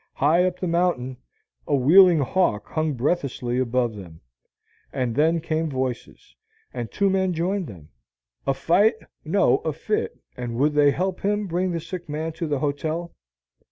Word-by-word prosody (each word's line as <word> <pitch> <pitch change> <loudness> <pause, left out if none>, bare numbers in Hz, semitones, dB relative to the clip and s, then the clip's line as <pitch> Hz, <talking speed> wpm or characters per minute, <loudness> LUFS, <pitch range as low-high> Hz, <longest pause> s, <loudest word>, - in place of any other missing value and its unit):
High 165 +6 +3
up 180 0 -2
the 185 - -2
mountain, 165 -7 0 0.5
a - - +2
wheeling 165 +5 +6
hawk 135 - 0
hung 155 -1 -1
breathlessly 125 -3 -1
above 120 -2 0
them. 85 -5 -11 0.7
And 125 -4 -2
then 160 +6 +2
came 160 0 -2
voices, 130 -3 -5 0.4
and 120 -2 -4
two 200 - +1
men 190 -1 +1
joined 180 +3 -1
them. 85 - -12 0.6
"A 135 - +2
fight?" 205 - +3 0.3
No, 180 +6 +3
a 160 - -2
fit; 185 +8 -2 0.2
and 120 -2 -5
would 145 +5 +2
they 145 -1 +5
help 185 +5 -1
him 205 +1 0
bring 180 +1 -1
the 170 -1 -2
sick 170 0 -8
man 155 +2 -3
to 165 0 -4
the 145 -2 0
hotel? 155 +4 -3
155 Hz, 160 wpm, -24 LUFS, 130-180 Hz, 0.7 s, wheeling